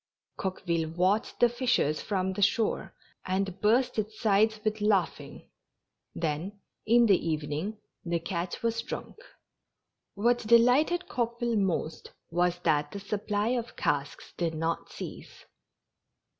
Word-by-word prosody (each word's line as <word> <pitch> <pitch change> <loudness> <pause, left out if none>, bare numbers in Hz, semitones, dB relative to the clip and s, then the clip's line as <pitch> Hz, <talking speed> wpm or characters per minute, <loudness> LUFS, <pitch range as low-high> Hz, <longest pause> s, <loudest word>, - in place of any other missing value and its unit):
Coqueville 170 -4 -2
watched 190 +5 +1
the 240 - +7
fishers 240 - +1
from 190 -2 -1
the 205 - -4
shore, 220 +2 +1 0.3
and 190 0 -2
burst 230 +3 +3
its 215 0 -4
sides 215 +1 +3
with 215 0 -1
laughing; 205 -4 0 0.7
then, 170 +5 -3 0.3
in 235 +2 +6
the 195 -5 +4
evening, 155 +6 -2 0.3
the 170 -1 0
catch 175 +2 -4
was 230 0 0
drunk. 235 - -7 1.0
What 235 +4 +2
delighted 250 +10 +4
Coqueville 235 -1 -1
most 180 -4 -2 0.2
was 175 +1 +1
that 150 -2 +2
the 200 - -6
supply 205 +1 -1
of 240 -1 -2
casks 145 -1 -2
did 165 -2 -1
not 165 +1 -2
cease. - - -9
200 Hz, 125 wpm, -29 LUFS, 170-230 Hz, 1.0 s, the